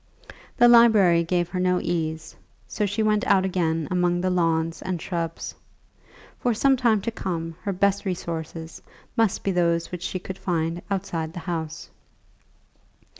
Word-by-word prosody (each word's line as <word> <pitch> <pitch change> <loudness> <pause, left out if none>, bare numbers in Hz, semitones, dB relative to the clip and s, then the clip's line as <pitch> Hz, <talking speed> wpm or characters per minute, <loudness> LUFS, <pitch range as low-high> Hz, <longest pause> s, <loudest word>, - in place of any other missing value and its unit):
The 240 - +7
library 215 -8 +6
gave 175 0 0
her 180 - -3
no 180 0 +2
ease, 160 -1 -3 0.3
so 210 - -1
she 205 +3 -1
went 215 0 +2
out 190 -1 +4
again 165 -4 0
among 175 -1 +1
the 185 +1 0
lawns 165 -2 0
and 185 -2 -3
shrubs. 165 -1 -4 0.9
For 240 -2 +1
some 270 +4 +4
time 235 -5 +2
to 230 - -2
come 165 -6 -4
her 200 - -2
best 200 +1 +1
resources 165 -3 -5 0.3
must 225 -4 +1
be 195 - +1
those 170 -2 +1
which 180 -2 -5
she 185 - -3
could 185 +1 -7
find 170 -1 -1
outside 170 -5 -3
the 180 - -6
house. 160 -3 -5
180 Hz, 155 wpm, -24 LUFS, 165-195 Hz, 0.9 s, The